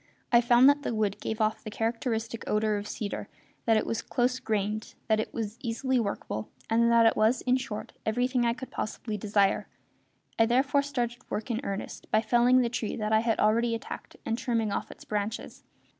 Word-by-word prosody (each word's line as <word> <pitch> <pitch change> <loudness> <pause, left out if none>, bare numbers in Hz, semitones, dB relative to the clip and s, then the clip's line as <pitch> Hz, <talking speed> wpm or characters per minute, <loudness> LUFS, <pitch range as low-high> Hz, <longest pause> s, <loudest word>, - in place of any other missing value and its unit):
I 235 -1 +7
found 240 +2 +6
that 285 0 +5
the 240 - -2
wood 210 -2 0
gave 220 - -3
off 215 0 0
the 215 - -5
characteristic 225 +1 -2
odour 215 0 +1
of 205 0 -5
cedar; 205 -1 -4 0.4
that 225 -1 +5
it - - 0
was 230 - -2
close 250 0 0
grained; 215 -1 -2
that 220 -1 +3
it 220 - -2
was 220 0 -4
easily 255 +2 0
workable; 200 - -3 0.2
and 235 +1 +4
that 230 0 +6
it 225 - +5
was, 220 +4 +3
in 255 0 +2
short, 215 -5 -6
everything 245 +3 +1
I 235 0 +2
could 260 - -8
possibly 215 0 -4
desire. 200 -1 +1 0.7
I 225 - +5
therefore 270 +4 +3
started 245 -4 -2
work 220 +3 -3
in 230 +1 -1
earnest 195 -5 -5
by 215 +1 +3
felling 245 +2 +4
the 240 - +2
tree 230 -2 -3
that 215 -1 -1
I 220 - +6
had 225 0 0
already 230 +2 +3
attacked 225 - -8
and 225 +1 -1
trimming 230 -4 0
off - - -3
its - - -12
branches. 210 +1 -3
225 Hz, 200 wpm, -28 LUFS, 215-240 Hz, 0.7 s, I